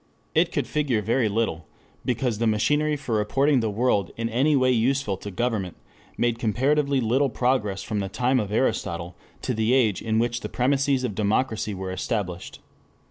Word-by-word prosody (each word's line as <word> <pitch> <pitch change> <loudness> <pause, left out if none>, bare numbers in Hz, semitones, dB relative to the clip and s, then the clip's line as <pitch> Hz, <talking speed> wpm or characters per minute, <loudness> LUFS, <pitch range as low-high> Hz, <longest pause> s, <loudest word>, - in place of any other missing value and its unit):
It - - +3
could - - -1
figure 135 -8 0
very 115 +1 +1
little, 100 -7 -1 0.4
because 120 -3 -1
the 115 - +1
machinery 150 +8 +2
for 130 -5 -4
reporting 135 +7 +2
the 110 -2 0
world 105 -3 +1
in 115 0 -2
any 135 +6 +2
way 130 -1 +3
useful 125 -2 +1
to 100 - -7
government 100 -2 -2 0.4
made 120 -1 0
comparatively 140 +5 +1
little 130 +4 +2
progress 110 -6 0
from 105 0 -2
the 95 -1 -3
time 125 +5 +1
of 105 -3 -3
Aristotle 95 -7 -1 0.3
to 125 - -1
the 110 +2 +1
age 110 -7 +2
in 110 -1 0
which 120 +1 0
the - - -6
premises 135 +1 +1
of 120 -5 -2
democracy 110 +1 0
were 95 0 -5
established. 95 -3 -4
115 Hz, 175 wpm, -25 LUFS, 105-130 Hz, 0.4 s, It